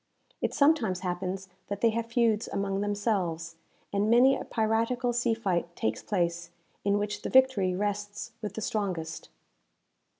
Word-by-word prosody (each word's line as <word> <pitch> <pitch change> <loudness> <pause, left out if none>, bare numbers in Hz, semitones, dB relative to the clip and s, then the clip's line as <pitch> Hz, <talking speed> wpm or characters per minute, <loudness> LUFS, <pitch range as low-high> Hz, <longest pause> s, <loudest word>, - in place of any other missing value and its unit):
It - - 0
sometimes 280 - +3
happens 185 +1 -3 0.2
that 200 0 -4
they 230 - +4
have 230 +1 -2
feuds 230 -2 +2
among 195 0 -1
themselves, 190 -6 -1 0.4
and 200 +2 +2
many 250 +4 +6
a - - -4
piratical 230 +2 0
sea 235 -1 +1
fight 175 -6 -1
takes 110 0 -1
place, 170 -3 -1 0.3
in 200 0 +2
which 205 0 -2
the - - -4
victory 255 -9 +4
rests 205 +3 -3
with 210 - -5
the 220 - -4
strongest. 180 -8 -3
205 Hz, 145 wpm, -29 LUFS, 185-230 Hz, 0.4 s, many